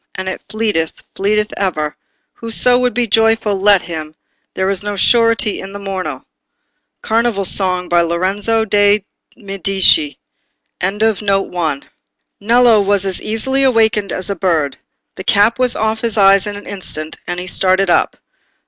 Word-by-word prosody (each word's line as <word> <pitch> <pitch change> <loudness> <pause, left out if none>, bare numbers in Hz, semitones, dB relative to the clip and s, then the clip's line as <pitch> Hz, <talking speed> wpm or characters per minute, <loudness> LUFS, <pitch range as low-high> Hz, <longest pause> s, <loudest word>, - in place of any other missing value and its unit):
And 190 0 -5
it 190 - -4
fleeteth—fleeteth 210 +1 -2
ever; 155 -6 -2 0.4
Whoso 245 +2 +1
would 250 -1 0
be 245 -1 +1
joyful—let 210 -3 +2
him! 155 -2 -7 0.4
There's 190 +1 -1
no 205 0 -3
surety 230 0 +2
for - - -7
the 200 +1 -8
morrow." 185 -9 -5 0.8
Carnival 225 -3 0
Song 180 -2 +1
by 175 0 +3
Lorenzo 195 +6 0
de' 205 -1 +2 0.3
Medici. 195 - +1 0.6
Nello 205 0 +1 1.4
was 200 -1 +1
as 190 -2 -2
easily 265 +5 -1
awaked 220 -6 +2
as 185 +2 -3
a - - -2
bird. 160 -7 -1 0.4
The 190 - -6
cap 210 +5 +2
was 255 -1 +1
off 220 0 -1
his 230 -2 -1
eyes 195 0 +5
in 205 - -4
an 205 - -10
instant, 155 -5 -6
and 175 0 -3
he 180 - -6
started 185 0 +1
up. - - +1
200 Hz, 135 wpm, -16 LUFS, 185-220 Hz, 1.4 s, eyes